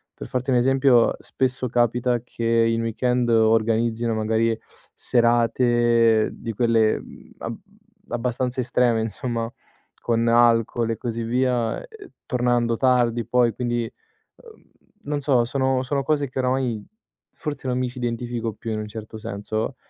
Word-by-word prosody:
per - - -8
farti 125 +1 -2
un 125 - +4
esempio, 130 -1 +4
spesso 130 -1 -2
capita 120 0 +1
che 115 -1 -6
in 115 0 +2
weekend 120 +2 0
organizzino 115 +1 +2
magari, 110 +1 +1 0.4
serate 120 -1 +3
di 115 - -6
quelle, 115 -1 +2
mhmm, - - -14
ab 115 - -5 0.5
abbastanza 125 +1 -2
estreme, 120 -2 +2
insomma, 115 +1 -3 0.5
con 115 0 0
alcol 115 -1 +3
e 115 - -3
così 115 -1 -4
via, 125 0 0
ehm, 445 -5 -12 0.2
tornando 120 -2 +1
tardi 120 -3 +2
poi, 120 -2 +2
quindi, 120 0 -2 0.4
uhm, 455 -2 -17 0.4
non 145 -1 -2
so, 130 -4 +2
sono 130 0 0
sono 140 +1 -1
cose 145 0 0
che 130 - -5
oramai 125 -4 0 0.5
forse 145 -4 -5
non 125 - 0
mi 130 - 0
ci 125 - -13
identifico 120 -1 -3
più 115 +1 -6
in 110 - -2
un 105 - -5
certo 110 0 -8
senso. 110 +2 -4
120 Hz, 140 wpm, -23 LUFS, 115-125 Hz, 0.5 s, un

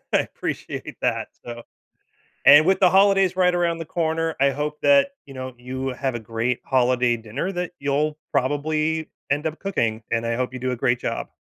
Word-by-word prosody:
I - - +5
appreciate - - -6
that. - - 0 0.2
So 120 0 -7 0.8
and 150 +2 +9
with 190 +2 +3
the 185 - +6
holidays 195 -1 +4
right 180 -1 +3
around 170 -1 +1
the 165 - -6
corner, 165 0 -1
I 140 +1 +4
hope 150 +2 -4
that, 280 0 +5 0.2
you 135 - -11
know, 130 0 -6
you 130 +2 -4
have 130 0 -3
a 120 - -3
great 115 +3 -2
holiday 125 -2 +2
dinner 115 - -4
that 180 -1 -4
you'll 145 +2 0
probably 155 +3 0 0.2
end 145 +3 0
up 160 0 -3
cooking, 115 - -1
and 115 0 0
I 115 0 0
hope 125 0 -2
you 130 - -7
do 130 0 -2
a - - -1
great 120 +1 +1
job. - - -3
145 Hz, 195 wpm, -23 LUFS, 125-165 Hz, 0.8 s, and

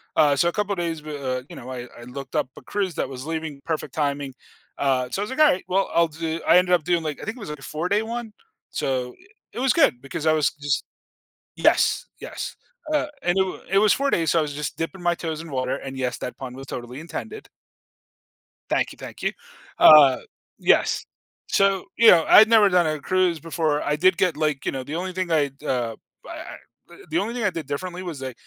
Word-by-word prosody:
Uh, 150 -2 +5
so 170 - +2
a - - +2
couple 205 -1 -1
days 165 -3 -3
bu 155 - -10
uh, 130 -2 -2
you - - -10
know, 125 - -9
I 125 -1 -6
I - - -10
looked 130 +1 -8
up - - +1
a - - -10
cruise 195 -5 -2
that - - -2
was 130 0 -7
leaving, 160 -3 -4
perfect 160 -1 -3
timing. 140 -2 -2 0.4
Uh, 130 -2 +1
so 195 - -3
I - - +1
was 210 - -5
like, 265 - -5
"Alright, 295 -12 +4
well, 195 +1 +1
I'll 170 0 +4
do" 160 +1 -4
I 175 - +7
ended 180 0 +3
up 175 -3 +3
doing, 175 -2 +1
like, 150 -2 -3
think 220 +3 -5
it - - -12
was, 200 - -7
like, 150 - -6
a - - -16
four-day 180 +7 -1
one. 230 0 -5 0.4
So, 130 -2 -2
eh, - - -21 0.3
it - - -6
was 260 0 +3
good 200 - +3
because 135 +3 -6
I 155 - +5
was 150 -3 +2
just 145 -1 -2 0.7
Yes, - - +3
yes, - - -6 0.4
uh, 300 - +1
and 175 +1 +1
it 190 - +5
wa 185 - -6
it 195 - +2
was 210 0 +5
4 280 +1 0
days, 165 -10 +1
so 170 - +3
I - - +3
was 150 -1 -3
just 150 +1 -4
dipping 175 +3 -5
my 175 0 +3
toes 160 -2 -4
in 165 - -10
water- 130 -1 -1
and 135 0 -6
yes, 125 -1 -2
that - - -6
pun 130 -1 -7
was 135 - -9
totally 125 +2 -7
intended. 135 -8 -7 1.2
Thank - - +1
you, - - -15
thank - - -10
you. - - 0 0.5
Uh, 145 -4 +8 0.4
yes. - - +2 0.4
So, 195 -1 +2
you 230 - +6
know, 165 -2 +6
I'd 220 - +8
never 220 -3 +6
done 180 -3 +3
a 155 -1 -2
cruise 180 +1 +1
before. 155 -1 -1
I 150 - 0
did 185 +3 +4
get, 180 -5 +2
like, 150 -3 -1
you - - 0
know 135 - -4
the 145 +5 -5
only 185 +2 -3
thing 185 -1 -3
I'd, 145 -3 0
uh, 120 -6 -2 0.3
b - - -11
I - - -6
I - - -8 0.4
uh, - - -13
the 160 - +1
only 215 +6 -2
thing 245 - -3
I 205 - +3
did 165 -5 -6
differently 180 +5 -4
was 160 -7 -6
I 130 -1 -4
160 Hz, 240 wpm, -24 LUFS, 140-185 Hz, 1.2 s, Uh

